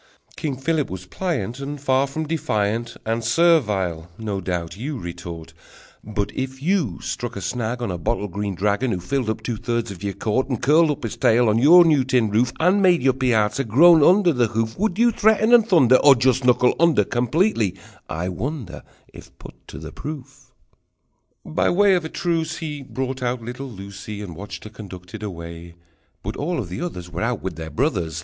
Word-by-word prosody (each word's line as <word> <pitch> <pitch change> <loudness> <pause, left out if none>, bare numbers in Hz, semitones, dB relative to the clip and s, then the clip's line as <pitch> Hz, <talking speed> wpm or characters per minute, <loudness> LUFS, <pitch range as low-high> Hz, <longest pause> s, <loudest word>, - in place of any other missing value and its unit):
King 140 -4 -3
Philip 150 +2 -1
was 90 0 -7
pliant, 125 - -3
And 145 +1 -5
far 135 0 +1
from 155 +3 -4
defiant 115 -7 -2
"And 115 +1 -1
servile," 105 - +2
no 105 -3 -4
doubt 85 -2 -4
you 135 +7 -5
retort! 85 -4 -8 0.5
But 105 -1 -3
if 130 0 -4
you 155 - 0
struck 120 -1 -5
a - - -4
snag 120 +5 -3
on 115 - -2
A 90 - -4
bottle 105 +4 -1
green 100 +1 -4
dragon, 105 +7 0
Who 90 - -3
filled 130 +5 -2
up 110 - -3
two 120 -3 -3
thirds 115 -1 -2
of 95 - -10
your 100 -1 -3
court, 130 +5 -1
And 125 -5 -2
curled 155 +5 +4
up 145 - -3
his 115 - -4
tail 120 +1 +3
on 110 +1 +3
your 170 +7 +7
new 150 -5 +3
tin 125 -5 +1
roof, 115 +3 +2
And 185 +5 +3
made 180 -6 +4
your 130 -1 +4
piazza 125 -1 +1
groan 155 +8 +6
under 180 +1 +5
his 120 -4 +1
hoof, 115 0 -1
Would 210 -3 0
you 235 +1 +4
threaten 220 +1 +3
and 230 -2 +6
thunder, 130 -8 +6
Or 140 -2 +6
just 130 +1 +2
knuckle 125 0 +4
under 160 -10 +4
Completely, 120 - 0 0.3
I 85 +3 -3
wonder, 115 - -5 0.3
If - - -14
put - - -12
to - - -9
proof? 140 -3 -9 0.9
By - - 0
way 200 +2 +4
of 180 -2 +1
a 160 - -5
truce, 165 -2 -2
he 150 -4 -5
Brought 130 0 -5
out 120 -1 -2
little 125 +4 -7
Lucie 100 0 -8
And 90 -5 -8
watched 100 +4 -8
her 110 - -10
conducted 95 -1 -10
away, 85 -3 -8 0.5
But - - -5
all 170 +4 -2
of 105 - -4
the 90 - -5
others 90 - -6
Were 85 - -5
out 115 0 -2
with 95 -3 -4
their 80 0 -7
brothers! 90 - -1
120 Hz, 195 wpm, -22 LUFS, 100-150 Hz, 0.9 s, your